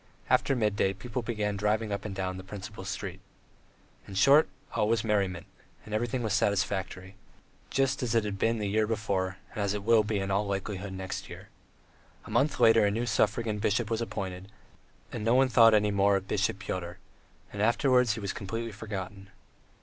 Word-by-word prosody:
After 135 - +3
midday 105 -4 +1
people 120 +6 -5
began 105 -3 -2
driving 105 +2 0
up 100 - -3
and 100 -2 -5
down 95 -1 -3
the 95 - -8
principal 95 +1 -8
street. 95 - -5 0.9
In 95 - -9
short, 140 +10 +6 0.2
all 105 -2 +1
was 115 -2 +2
merriment, 100 -5 0 0.4
everything 120 +3 -2
was 110 -3 -1
satisfactory, 95 -2 -1 0.6
just 135 +1 +1
as 120 -2 -1
it 115 - +3
had 100 -2 -4
been 115 +3 +2
the 105 - -2
year 110 +2 +1
before, 100 -4 -1 0.2
and - - -6
as 100 0 0
it 100 - -4
will 115 0 +5
be 105 0 -1
in 95 0 -2
all 100 +1 +1
likelihood 100 0 -4
next 95 -1 -5
year. - - -10 0.8
A - - -10
month 145 +2 +1
later 115 -1 +6
a 100 - +4
new 115 +4 -1
suffragan 110 -1 0
bishop 105 +2 0
was 115 0 0
appointed, 95 -3 -5 0.6
and - - -5
no 115 +3 +3
one 130 0 +4
thought 115 -2 +7
anything 105 -1 +2
more 100 0 +4
of 95 0 -2
Bishop 100 -1 0
Pyotr, 90 -3 -5 0.6
and 100 - -3
afterwards 125 +1 +3
he - - -5
was 100 -2 -3
completely 115 +4 -4
forgotten. 100 -2 -7
105 Hz, 185 wpm, -29 LUFS, 95-115 Hz, 0.9 s, thought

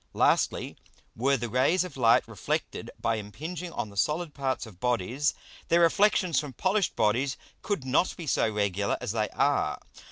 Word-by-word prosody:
Lastly, - - +1 0.4
Were 135 +4 +2
the 120 - -3
Rays 130 - +2
of 180 - -8
Light 115 -3 +4
reflected - - -3
by 115 -1 0
impinging 160 - -6
on 110 - -4
the - - -14
solid 150 - 0
parts 130 -4 -2
of 100 -6 -14
Bodies, 125 +5 0 0.3
their 170 +1 +4
Reflexions 180 0 +3
from 145 -3 -6
polish'd 190 - 0
Bodies 125 +6 +1 0.2
could 200 -11 -2
not 140 +7 +1
be 170 - -6
so 130 - +2
regular 100 -1 0
as - - -3
they 110 -1 -1
are. - - +1
130 Hz, 165 wpm, -28 LUFS, 110-170 Hz, 0.4 s, Light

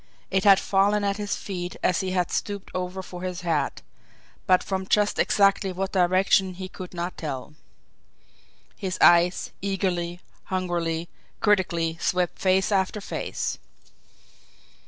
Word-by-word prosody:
It 190 0 +1
had 195 -1 +8
fallen 205 +1 +2
at 200 0 0
his 205 -1 -2
feet 180 -3 -5
as 180 - +2
he 190 -2 -2
had 180 -1 0
stooped 200 -2 -3
over 185 +1 -4
for 180 -1 -9
his 180 -1 -4
hat 160 -5 -1 0.6
but 185 -1 +4
from 190 -1 -3
just 210 0 +2
exactly 195 -1 +3
what 190 +1 -3
direction 185 0 +3
he 185 0 -6
could 185 -1 -9
not 175 +1 -4
tell. 145 -2 -5 1.2
His 190 -3 -4
eyes, 175 +1 +5
eagerly, 180 -3 -1 0.3
hungrily, 175 -3 -2 0.3
critically, 170 -6 +1
swept 180 -1 0
face 190 +2 +2
after 195 +1 +1
face. 200 - -4
185 Hz, 135 wpm, -25 LUFS, 175-195 Hz, 1.2 s, had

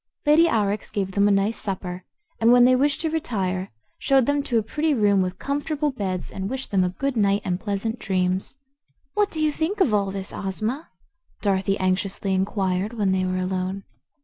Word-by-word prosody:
Lady 310 +3 +6
Aurex 210 -5 0
gave 195 -2 -2
them 200 +2 +3
a - - +4
nice 200 +3 +1
supper 185 -2 -5 0.4
and 230 +1 +5
when 245 0 +7
they 255 0 +5
wished 285 +3 +1
to 320 -1 -1
retire 195 -12 -2 0.3
showed 270 -3 +3
them 285 +1 +1
to 245 -4 0
a 220 - +2
pretty 300 +7 0
room 205 -4 +3
with 185 0 -2
comfortable 290 +3 -1
beds 190 -7 -4
and 190 0 -4
wished 265 +1 -5
them 190 -2 +3
a 180 - +1
good 275 +8 -2
night 200 -2 +2
and 180 -1 -1
pleasant 215 +3 -3
dreams. 185 +3 -1 0.6
"What 415 -1 +2
do 320 - -5
you 310 -1 +2
think 325 +8 -2
of 275 - +3
all 200 -2 +2
this, 195 0 -5
Ozma?" 215 - -3 0.5
Dorothy 195 -1 +1
anxiously 190 +1 0
inquired 190 +1 0
when 205 -4 +1
they 185 0 +1
were 185 0 -1
alone. 185 +1 -2
200 Hz, 195 wpm, -24 LUFS, 190-265 Hz, 0.6 s, when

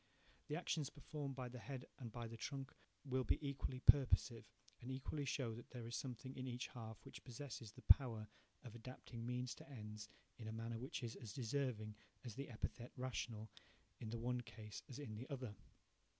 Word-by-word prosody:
The 150 - +1
actions 155 -4 +2
performed 145 -1 -3
by 130 -1 -1
the 125 0 -5
head 130 +2 -4
and 120 -4 -4
by 120 0 -2
the 115 - -5
trunk 135 +4 -2 0.3
will 130 -1 +3
be - - +5
equally 135 -2 -1
purposive, 130 -4 +8 0.4
and 125 - -3
equally 135 +2 0
show 130 -3 +1
that 120 +2 -7
there 120 -3 -4
is 115 - -4
a - - +3
something 130 0 -3
in 130 0 -2
each 125 0 -1
half 110 -2 -6
which - - -8
possesses 120 -3 -4
the - - -11
power 115 -6 +8 0.4
of 120 - -7
adapting 120 0 -6
means 125 0 +1
to 160 0 -11
ends 105 -4 -5 0.3
in 110 - -4
a - - -1
manner 115 +1 -1
which 130 +2 -2
is 115 0 -1
as 110 -5 -5
deserving 120 -3 +1 0.3
as 120 - -2
the 140 +5 -3
epithet 120 +1 -2
'rational' 120 -4 -1 0.5
in 110 - -3
the 115 - 0
one 125 +1 +2
case 105 -2 -6
as 130 - -4
in 145 -7 -3
the 125 +4 -5
other. 130 -6 -2
125 Hz, 195 wpm, -44 LUFS, 115-135 Hz, 0.5 s, purposive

